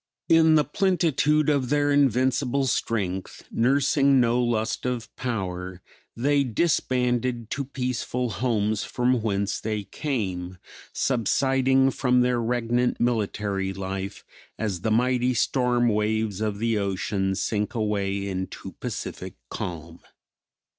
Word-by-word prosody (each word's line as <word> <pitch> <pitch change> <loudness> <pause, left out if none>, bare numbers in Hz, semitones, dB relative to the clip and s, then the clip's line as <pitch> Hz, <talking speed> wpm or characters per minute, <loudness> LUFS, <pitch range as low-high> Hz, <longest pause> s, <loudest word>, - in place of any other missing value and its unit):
In 160 -1 +6
the 150 - +5
plentitude 155 -3 +2
of 140 -4 +1
their 145 0 +2
invincible 135 0 +2
strength, 95 -6 -2
nursing 140 +2 +3
no 120 0 +3
lust 115 -2 -1
of 125 -2 -4
power, 95 -6 -4 0.4
they 140 +3 +2
disbanded 125 -3 0
to 140 -1 -2
peaceful 125 -2 -2
homes 110 0 0
from 125 -1 0
whence 100 -2 -1
they 110 -1 -3
came; 95 - -3 0.3
subsiding 135 +2 +2
from 125 -1 +2
their 125 -1 +1
regnant 120 +1 0
military 105 -4 -1
life 95 +1 -5 0.3
as 100 -6 -2
the 110 - 0
mighty 125 +2 +2
storm 125 0 +2
waves 105 -1 0
of 105 -2 -1
the 115 0 0
ocean 95 0 -1
sink 105 +3 -2
away 100 -3 -1
into 95 -1 -5
pacific - - -5 0.2
calm. 85 -1 -6
120 Hz, 115 wpm, -25 LUFS, 100-130 Hz, 0.4 s, In